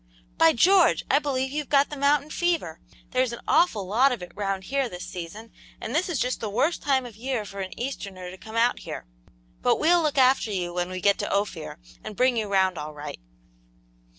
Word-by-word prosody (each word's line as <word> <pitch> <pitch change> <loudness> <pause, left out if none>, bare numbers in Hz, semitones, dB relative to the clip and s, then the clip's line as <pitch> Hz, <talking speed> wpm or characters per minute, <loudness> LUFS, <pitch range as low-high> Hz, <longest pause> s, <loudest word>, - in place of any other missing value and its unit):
"By 165 - +6
George! 365 +7 +4
I 280 - +5
believe 265 -3 -2
you've 295 -1 -4
got 280 0 +3
the - - -4
mountain 285 +1 +2
fever; 335 - -1 0.3
there's 255 -1 +1
an 235 - -7
awful 310 - +3
lot 240 +9 +3
of 235 -7 -3
it 175 - -9
round 195 -2 -2
here 270 +3 -1
this 180 -2 -7
season, 185 +6 -8 0.3
and 230 - -5
this 340 +5 +1
is 335 - -1
just 250 +1 -1
the 220 - -3
worst 295 +11 0
time 265 -3 +1
of 235 -4 -10
year 240 -1 -3
for 200 0 -9
an 190 -1 -6
easterner 195 -8 -5
to 185 - -11
come 220 0 -10
out 235 +2 +2
here. - - -7 0.6
But - - +3
we'll 345 +2 +4
look 300 -3 -1
after 260 -3 +4
you 175 -3 -2
when 175 0 -2
we 185 0 -5
get 200 +1 +3
to - - -2
Ophir, 200 -6 -2 0.3
and 215 - -7
bring 250 +3 +3
you 220 -2 -1
round 190 -3 +2
all 150 0 -7
right." 145 0 -7
230 Hz, 215 wpm, -25 LUFS, 190-275 Hz, 0.6 s, By